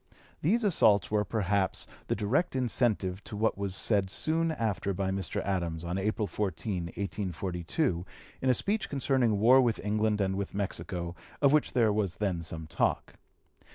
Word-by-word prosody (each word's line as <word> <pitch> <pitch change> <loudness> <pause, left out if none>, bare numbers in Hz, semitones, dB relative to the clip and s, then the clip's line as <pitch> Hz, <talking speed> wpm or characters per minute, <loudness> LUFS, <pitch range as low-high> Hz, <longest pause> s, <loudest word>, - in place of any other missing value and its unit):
These 220 +10 +2
assaults 105 - +4
were 105 -1 +2
perhaps 100 -2 0 0.2
the - - 0
direct 115 - 0
incentive 110 -6 0
to 105 - -6
what 110 +1 +1
was 100 -1 -3
said 100 -2 +1
soon 160 - +1
after 105 - -1
by 95 0 -1
Mr. 95 -3 -2
Adams, 85 -4 -2
on 85 +2 -2
April 105 +2 0
14, 95 -2 -2
1842, 90 - -2 0.4
in 130 - +1
a - - +6
speech 205 - 0
concerning 130 -5 +1
war 125 +5 +7
with 120 -3 +1
England 105 0 +1
and 95 -1 +1
with 100 0 -4
Mexico, 90 -3 -3 0.3
of 140 -1 +4
which 150 - +2
there 115 -5 +3
was 100 -4 -1
then 95 -5 -1
some 80 -1 -6
talk. 80 - -1
100 Hz, 160 wpm, -30 LUFS, 95-120 Hz, 0.4 s, war